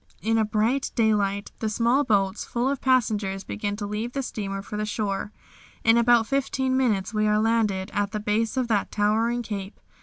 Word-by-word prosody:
in 225 +1 +2
a - - +3
bright 220 +5 0
daylight, 205 -3 +1
the 220 - -1
small 235 +6 +2
boats 200 -5 +1
full 240 +2 -1
of 275 -1 -1
passengers 215 -7 +1
begin 205 -1 -3
to 205 0 -5
leave 215 +4 -4
the 275 - -2
steamer 195 -5 -4
for 210 - -7
the 210 - -1
shore. 205 -1 -2 0.5
In 225 0 +5
about 235 -1 +4
fifteen 265 0 0
minutes 220 -7 +1
we 215 0 +1
are 210 0 +3
landed 215 -3 +1
at 205 -1 0
the 215 0 -4
base 220 +4 -1
of 255 -2 +1
that 210 -3 +1
towering 225 +3 +1
Cape. 200 -2 -6
215 Hz, 190 wpm, -25 LUFS, 205-235 Hz, 0.5 s, In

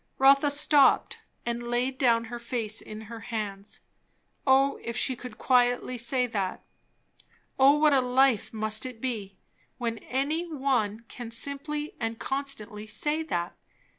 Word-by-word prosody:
Rotha 275 +2 +5
stopped 285 0 +3 0.3
and 240 0 -3
laid 255 +2 -1
down 235 -3 +3
her 240 +1 -7
face 235 -3 -3
in 215 0 -9
her 225 +1 -9
hands. 210 -3 -5 0.7
O 270 +1 +4
if 235 0 -5
she 260 - +2
could 245 -2 -10
quietly 245 0 +2
say 250 +2 +1
that! 200 -6 -3 1.0
O 275 +2 +6
what 300 -1 +4
a 270 - +4
life 250 -2 +2
must 215 -1 0
it 255 -3 -6
be, 215 -6 -4 0.4
when 230 -2 -3
any 310 +6 -2
one 250 -7 0
can 240 -1 -8
simply 280 +5 +1
and 225 -1 -3
constantly 230 -7 -4
say 300 +7 -1
that! 175 - -3
245 Hz, 140 wpm, -27 LUFS, 225-275 Hz, 1.0 s, O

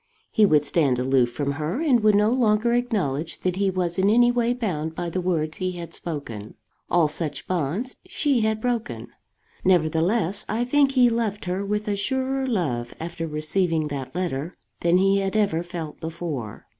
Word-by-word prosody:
He 215 -1 +5
would 150 -4 +3
stand 140 -6 +2
aloof 125 -1 +2
from 140 +3 -2
her, 155 - -3
and 290 -7 +3
would 215 -1 +4
no 210 +2 +4
longer 235 -2 +2
acknowledge 185 - -1
that 185 0 -1
he 200 0 +2
was 180 -1 -1
in 195 +2 +4
any 240 +2 +5
way 240 -1 +1
bound 165 -10 -2
by 175 0 -3
the 185 - -1
words 160 -4 -1
he 185 -1 -2
had 170 -2 -7
spoken. 120 -11 -6 0.3
All 170 -3 +4
such 150 -1 -4
bonds 185 - -2
she 290 -8 +1
had 220 0 +1
broken. 220 - -3 0.5
Nevertheless 180 +3 +2
I 230 +3 0
think 275 +1 +3
he 250 -2 +5
loved 225 -4 -1
her 185 +2 -2
with 210 +1 -2
a 205 - 0
surer 265 +5 -1
love 140 - -2
after 165 0 -4
receiving 155 +1 0
that 135 -1 -6
letter 170 -3 -3 0.2
than 170 +1 +3
he 195 +1 +3
had 195 +1 -2
ever 200 -6 +2
felt 170 -3 -7
before. 160 -9 -5
180 Hz, 180 wpm, -24 LUFS, 155-220 Hz, 0.5 s, He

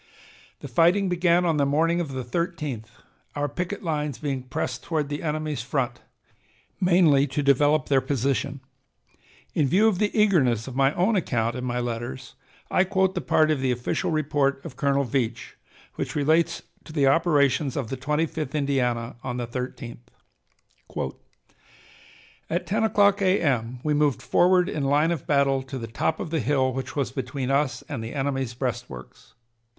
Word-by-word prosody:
The - - -6
fighting 180 +3 +3
began 175 0 +2
on 165 -3 +2
the 145 - +3
morning 165 +4 +2
of 155 -5 -4
the 130 -1 -4
13th, 150 -4 -3 0.5
our 145 0 0
picket 180 +8 -4
lines 150 -5 -2
being 140 -3 -3
pressed 125 0 -4
toward 155 -4 -2
the 145 0 -4
enemy's 155 -2 -2
front, 125 0 -2 0.8
mainly 170 -7 +4
to 145 +2 -2
develop 145 +1 +3
their 135 -2 +3
position. 140 +1 -1 0.9
In 145 - +2
view 200 +10 +4
of 200 -5 +1
the 210 - +2
eagerness 135 - +3
of 130 - -7
my 135 0 +3
own 200 +5 +2
account 120 - 0
in 125 - -4
my 125 0 -1
letters, 120 +2 -5 0.4
I 185 - +4
quote 190 0 +1
the 180 - -2
part 155 0 +3
of 145 -4 0
the 130 - +1
official 120 0 -1
report 145 -3 +1
of 150 -6 -8
Colonel 140 0 +1
Veatch, 120 -2 -2 0.4
which - - -4
relates 160 +4 +2 0.2
to - - -11
the 145 -3 +2
operations 140 -2 +2
of 130 -6 -3
the - - -1
Twenty 150 +5 0
fifth 155 -3 -5
Indiana 125 -5 -1
on 125 -1 -3
the 120 - -2
13th: 120 0 -6 2.4
"At 170 +3 -1
10 215 +3 0
o'clock 205 -2 +3
A.M. 130 - +1
we 150 - +1
moved 145 -5 +1
forward 180 0 +3
in 150 - -3
line 145 +4 +3
of 165 -6 -4
battle 140 -2 +2
to 130 0 -7
the 115 - -5
top 115 +8 -1
of 160 - -5
the 165 - +1
hill 130 0 +1
which 135 +1 -5
was 140 -3 -1
between 130 0 -3
us 135 -3 0
and 140 -7 -5
the 115 +5 -6
enemy's 135 -3 -2
breastworks. 120 - -6
140 Hz, 170 wpm, -25 LUFS, 130-165 Hz, 2.4 s, mainly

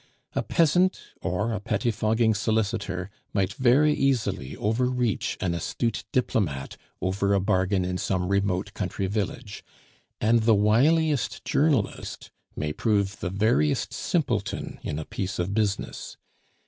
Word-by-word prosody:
A - - 0
peasant 175 +3 +3 0.2
or 105 +7 -1
a 105 - -2
pettifogging 110 +1 +1
solicitor 105 -3 -1 0.2
might 95 -2 +1
very 135 +6 +4
easily 135 - 0
overreach 125 +1 0
an 90 -2 0
astute 110 +7 -2
diplomate 100 - -1 0.3
over 100 +2 +1
a - - +3
bargain 95 -1 +1
in 90 0 -2
some 90 -1 -1
remote 100 0 0
country 95 0 -3
village; 105 +2 -3 0.6
and 115 +2 +3
the 110 0 +4
wiliest 120 +2 +2
journalist 140 -8 0 0.2
may 75 0 -2
prove 100 -2 0
the 90 - -2
veriest 100 -6 +1
simpleton - - -2
in 75 - -4
a 80 - -4
piece 95 0 -4
of 90 +3 -1
business. 105 -2 -2
105 Hz, 125 wpm, -26 LUFS, 95-120 Hz, 0.6 s, very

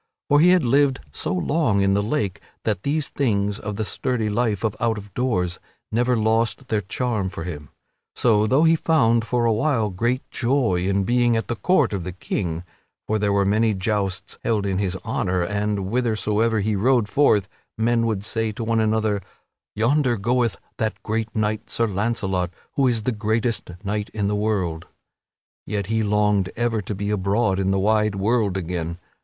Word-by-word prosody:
For 145 0 +5
he 170 +4 +6
had 180 -6 +4
lived 135 +2 +3
so - - -4
long 100 - +1
in 100 0 +3
the 100 - +2
Lake 105 -3 -2 0.2
that 105 -4 -1
these 150 +3 -1
things 105 -6 0
of 105 0 -5
the 110 +1 -2
sturdy 115 -2 -1
life 110 -3 0
of 110 -3 0
out 115 -1 +1
of 100 -2 -10
doors 90 -8 -1 0.3
never 120 +2 +2
lost 115 +4 0
their 110 -2 +1
charm 105 0 -2
for 85 -3 -6
him. 75 -5 -7 0.5
So, 110 -3 +3
though 135 +7 +3
he 165 0 +5
found, 120 -9 +3
for 120 0 0
a 115 - +3
while, 110 -3 +1
great 120 +8 -1
joy 120 -8 +1
in 100 0 +1
being 120 +1 +2
at 115 - -3
the 120 - 0
court 150 - +2
of 95 -3 -2
the 90 +1 -5
King 85 -2 -3 0.4
(for 110 0 0
there 100 -1 +1
were 100 0 +2
many 110 +2 +2
jousts 95 -1 -2
held 105 -3 0
in 95 -1 0
his 95 -2 -1
honor, 95 -5 0
and, 105 +3 -1
whithersoever 110 +1 0
he 105 +1 0
rode 120 +2 +2
forth, 105 -6 +3 0.3
men 115 +1 +2
would 105 -3 -1
say 110 0 -1
to 115 - -5
one 115 0 +1
another: 110 -2 +1 0.5
"Yonder 125 +2 +2
goeth 120 +2 +1 0.2
that 110 -1 -1
great 110 0 -1
knight, 110 0 -1
Sir 115 - +1
Launcelot, 95 -3 -1 0.2
who 135 -2 +2
is 115 -3 0
the 125 - 0
greatest 110 +1 -1
knight 105 +1 -2
in 105 -2 0
the 105 - 0
world"), 95 -6 -1 0.8
yet 100 -2 -2
he 110 - +2
longed 105 -2 +2
ever 115 -2 0
to 105 +2 -5
be 100 +2 -2
abroad 100 0 +1
in 95 0 +1
the 95 - +2
wide 105 +1 +2
world 100 -1 +1
again. 85 -2 -3
110 Hz, 185 wpm, -23 LUFS, 100-120 Hz, 0.8 s, he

